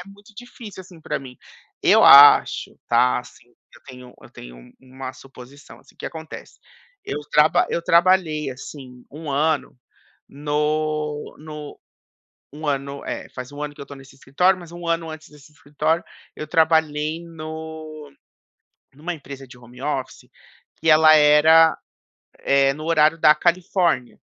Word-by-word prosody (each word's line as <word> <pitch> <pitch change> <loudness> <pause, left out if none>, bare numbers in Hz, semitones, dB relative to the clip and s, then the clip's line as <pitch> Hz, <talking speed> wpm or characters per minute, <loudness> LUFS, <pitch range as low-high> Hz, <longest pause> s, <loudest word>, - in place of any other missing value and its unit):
muito 205 +2 -18
difícil 225 -3 -11
assim, 180 -2 -15
pra - - -4
mim. 130 -2 -12 0.5
Eu - - +5
acho, 140 +1 +7
tá, 125 +2 +2
assim 125 0 -14 0.3
eu 120 - -19
tenho 125 -2 -13
eu - - -16
tenho - - -14
uma 130 0 -9
suposição, 135 +1 -15
assim. - - -23
O - - -39
que - - -7
acontece? 160 -1 -10 0.5
Eu 145 - -5
traba 150 +1 +3
eu 170 - -3
trabalhei 170 -4 +2
assim 130 -1 -11
1 150 +1 -8
ano 150 +1 -1 0.5
no 150 +1 -3
no 150 -1 -10 0.7
1 155 +2 -8
ano, 140 0 -4
é, - - -6
faz 125 -1 -9
1 145 - -10
ano 150 0 -6
que - - -15
eu 140 - -9
tô 140 - -11
nesse 135 0 -16
escritório, 180 +8 +1
mas 170 -2 -13
1 175 0 -9
ano 165 -1 -2
antes 155 0 -11
desse 150 0 -19
escritório 150 +3 -2 0.3
eu 155 - -7
trabalhei 160 -1 +1
no 155 -2 -9 0.8
numa 165 +5 -5
empresa 140 -3 -11
de 125 - -15
home 125 +1 -16
office 135 -2 -5 0.5
que 165 - 0
ela 155 0 +6
era, 155 +2 +5 0.6
eh, 135 0 +2
no 155 +2 -9
horário 160 0 +2
da 150 - +6
Califórnia, 175 -6 -1
150 Hz, 150 wpm, -21 LUFS, 140-160 Hz, 0.8 s, acho